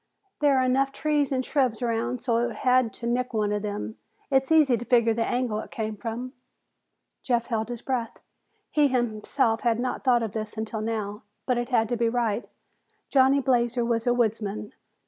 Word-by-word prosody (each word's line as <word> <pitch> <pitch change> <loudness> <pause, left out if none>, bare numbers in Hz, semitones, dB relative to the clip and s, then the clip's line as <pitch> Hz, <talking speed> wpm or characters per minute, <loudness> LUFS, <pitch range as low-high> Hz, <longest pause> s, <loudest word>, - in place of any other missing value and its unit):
There 285 -2 +4
are 260 - +3
enough 265 +2 +2
trees 295 -1 0
and 260 -1 0
shrubs 255 -6 +1
around 235 +1 -1
so 235 -2 +1
that 240 - 0
it 230 - -8
had 255 -2 +4
to 235 - -7
nick 245 0 -1
one 210 -1 +1
of 210 0 -1
them. 210 +1 -4 0.3
It's 265 +2 +2
easy 300 -6 +5
to 235 - -4
figure 235 -2 +3
the 230 +1 0
angle 245 -4 -1
it - - -7
came 220 -1 -4
from." 235 +4 -5 0.9
Jeff 240 -3 0
held 225 -2 -2
his 240 -1 -6
breath. 245 -4 -2 0.5
He 295 -1 +4
himself 235 -1 0
had 235 -2 +1
not 250 +1 -2
thought 245 -3 +3
of 220 - -3
this 215 0 -5
until 220 0 -3
now, 215 -2 -3 0.2
but 250 -2 +1
it 240 +1 -3
had 225 -3 +2
to 240 - 0
be 230 0 +2
right. 230 -2 -1 0.6
Johnny 270 0 +4
Blazer 240 -2 +1
was 230 0 -1
a 245 - +4
woodsman. 215 -3 -1
240 Hz, 195 wpm, -26 LUFS, 225-255 Hz, 0.9 s, easy